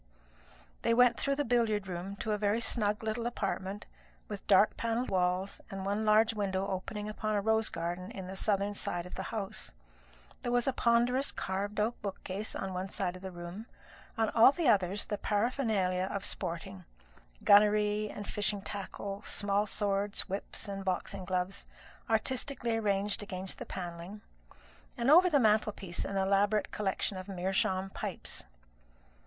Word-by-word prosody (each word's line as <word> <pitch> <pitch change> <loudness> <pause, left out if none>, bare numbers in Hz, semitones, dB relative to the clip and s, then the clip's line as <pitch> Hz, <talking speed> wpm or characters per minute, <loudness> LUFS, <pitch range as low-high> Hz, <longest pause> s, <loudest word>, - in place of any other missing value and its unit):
They 230 - +3
went 245 0 +5
through 275 - +1
the 290 0 0
billiard 220 -4 +1
room 185 +2 -5
to 220 - -2
a 210 - +1
very 210 +2 +2
snug 210 -2 +1
little 220 +2 -1
apartment, 200 -3 -3 0.4
with 205 -2 -7
dark 205 +1 +5
panelled 230 +2 -1
walls 185 +1 0
and 195 -1 -5
one 205 +2 0
large 220 +1 +5
window 195 -2 -1
opening 200 +2 -4
upon 215 0 -2
a 205 - +2
rose 220 +1 +2
garden 175 +2 -4
on 190 - -5
the 190 +1 -6
southern 200 0 0
side 175 -3 -3
of 180 - -10
the - - -4
house. 210 -4 -4 0.7
There 240 - -2
was 245 -1 +2
a 270 - +2
ponderous 245 +3 +2
carved 200 +2 -3
oak 220 +3 0
bookcase 200 +1 -4
on 190 -1 -3
one 185 +1 -3
side 185 -2 -2
of 185 - -10
the 190 - -5
room; 175 +5 -8 0.5
on 225 -1 +2
all 230 +3 +8
the 335 +1 -1
others 200 -3 +3
the 210 - -3
paraphernalia 205 -5 +1
of 200 - -3
sporting 165 - -4 0.6
gunnery 210 +1 +5
and 205 -1 -7
fishing 205 -1 -1
tackle, 200 0 -5
small 205 0 0
swords, 200 0 0
whips, 195 +1 -5
and 195 -1 -4
boxing 190 0 -2
gloves 185 +1 -2 0.4
artistically 240 +1 0
arranged 205 -1 0
against 190 -2 -3
the - - -6
panelling; 175 +3 -6 0.8
and 240 +3 +3
over 360 +4 +8
the 300 - +4
mantelpiece 210 -5 +1
an 195 - -3
elaborate 200 +2 +2
collection 195 -1 -1
of 185 - -8
meerschaum 190 0 0
pipes. - - -4
205 Hz, 160 wpm, -32 LUFS, 190-220 Hz, 0.8 s, all